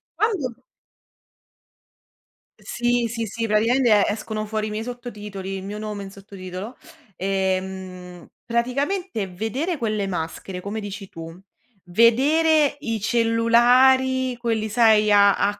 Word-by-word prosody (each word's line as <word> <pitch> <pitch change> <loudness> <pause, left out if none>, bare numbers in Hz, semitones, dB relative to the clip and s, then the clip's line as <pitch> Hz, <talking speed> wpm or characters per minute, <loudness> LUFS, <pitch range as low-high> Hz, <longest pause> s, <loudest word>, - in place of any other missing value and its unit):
quando 370 - 0 2.1
Sì, 240 0 0
sì, 230 0 -3
sì, 225 +2 -3
praticamente 220 0 +3
escono 215 0 -3
fuori 215 0 -2
i - - -5
miei 215 +1 -4
sottotitoli, 210 -6 -7
il 190 - -7
mio 205 +2 -6
nome 210 -2 -5
in 195 - -9
sottotitolo. 195 +3 -9 0.4
Ehm, 185 -2 -3 0.2
praticamente 255 - -1
vedere 240 - -3
quelle 215 -4 -1
maschere, 180 +1 -5
come 205 +3 -4
dici 200 -1 -7
tu, 165 0 -9 0.5
vedere 285 - +3
i 225 -6 -3
cellulari, 245 +3 +3
quelli 225 -2 -1
sai, 215 -2 +4
a 200 -1 +6
a 205 0 0
220 Hz, 115 wpm, -23 LUFS, 195-245 Hz, 2.1 s, a